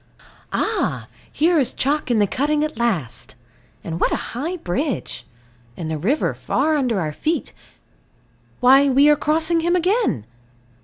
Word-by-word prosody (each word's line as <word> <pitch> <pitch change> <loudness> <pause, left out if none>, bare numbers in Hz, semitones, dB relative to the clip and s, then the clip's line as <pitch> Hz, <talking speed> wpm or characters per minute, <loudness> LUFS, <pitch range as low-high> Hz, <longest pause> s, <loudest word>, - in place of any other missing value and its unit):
Ah, - - -1 0.3
here 330 +2 +2
is 260 -3 0
chalk 290 +1 0
in 240 - +2
the 205 - +4
cutting 295 +8 0
at 305 -6 -4
last. 155 - -2 0.5
And 165 0 -5
what - - +2
a - - +1 0.2
high 320 +10 -3
bridge. 245 - -3 0.5
And 160 -2 -4
the 155 - -2
river 245 - 0
far 315 0 0
under 250 -8 0
our 155 -3 -2
feet. 320 - -2 1.1
Why 270 +3 +6
we 275 +3 +5
are 295 - +6
crossing 315 +3 +1
him 345 +2 +1
again! 360 - +1
275 Hz, 150 wpm, -21 LUFS, 205-315 Hz, 1.1 s, Why